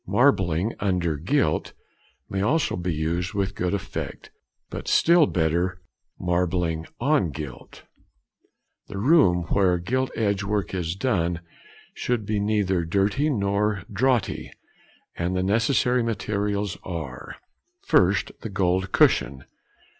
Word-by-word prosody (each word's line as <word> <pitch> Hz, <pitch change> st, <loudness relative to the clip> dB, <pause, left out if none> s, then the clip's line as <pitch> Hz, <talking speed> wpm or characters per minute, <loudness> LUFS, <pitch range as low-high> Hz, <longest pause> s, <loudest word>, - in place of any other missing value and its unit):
"Marbling 100 Hz, -, +2 dB
under 90 Hz, -5 st, 0 dB
gilt" 90 Hz, -, 0 dB, 0.5 s
may 95 Hz, -, -2 dB
also 145 Hz, +10 st, +1 dB
be 90 Hz, 0 st, -2 dB
used 85 Hz, +4 st, -2 dB
with 100 Hz, -1 st, -1 dB
good 90 Hz, 0 st, -1 dB
effect; 100 Hz, -, -6 dB, 0.4 s
but -, -, -6 dB
still 170 Hz, -2 st, +5 dB
better 85 Hz, +2 st, 0 dB, 0.4 s
"marbling 90 Hz, -2 st, 0 dB
on 140 Hz, -, +2 dB
gilt." 70 Hz, -3 st, -9 dB, 1.0 s
The 100 Hz, -, -7 dB
room 100 Hz, -, +4 dB
where 95 Hz, -3 st, +3 dB
gilt 130 Hz, +9 st, -1 dB
edge 100 Hz, -3 st, 0 dB
work 100 Hz, -3 st, -2 dB
is 85 Hz, -2 st, -2 dB
done 90 Hz, -7 st, 0 dB, 0.5 s
should 120 Hz, -4 st, -2 dB
be 105 Hz, 0 st, -1 dB
neither 100 Hz, -4 st, +1 dB
dirty 100 Hz, -, +1 dB
nor 100 Hz, -4 st, 0 dB
draughty, 120 Hz, 0 st, 0 dB, 0.7 s
and 90 Hz, +2 st, -1 dB
the 90 Hz, -, 0 dB
necessary 120 Hz, +5 st, +2 dB
materials 105 Hz, -2 st, -2 dB
are:— 80 Hz, -8 st, -6 dB, 0.5 s
_1st. 95 Hz, +5 st, +2 dB
The 110 Hz, -, -6 dB
Gold 95 Hz, -1 st, 0 dB
Cushion. 65 Hz, +1 st, +2 dB
95 Hz, 115 wpm, -25 LUFS, 85-110 Hz, 1.0 s, still